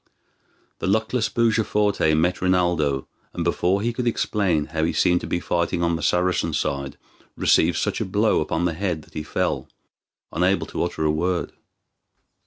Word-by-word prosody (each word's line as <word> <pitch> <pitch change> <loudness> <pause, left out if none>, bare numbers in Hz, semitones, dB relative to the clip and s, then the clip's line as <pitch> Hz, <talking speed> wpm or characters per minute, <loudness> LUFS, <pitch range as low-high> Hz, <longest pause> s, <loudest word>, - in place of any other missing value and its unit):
The - - -2
luckless 110 +3 +1
Bujaforte 105 -7 +2
met 90 +3 +1
Rinaldo, 85 -7 +1 0.3
and - - -3
before 95 +3 +1
he 120 +1 0
could 120 0 -2
explain 95 -9 +1
how 80 0 0
he 80 - +1
seemed 90 -1 +2
to - - -6
be 85 - -1
fighting 85 0 -1
on 85 0 +1
the 80 - -4
Saracen 90 0 +1
side 70 -1 -2 0.4
received 85 0 +3
such - - -1
a - - 0
blow 105 +1 +2
upon 80 +2 -1
the 85 - 0
head 85 -3 -2
that - - -22
he 75 - -4
fell, 75 - -2 0.6
unable 90 +3 +1
to - - -4
utter 85 -2 -2
a 75 - +3
word. 85 +3 -1
90 Hz, 170 wpm, -23 LUFS, 80-100 Hz, 0.6 s, received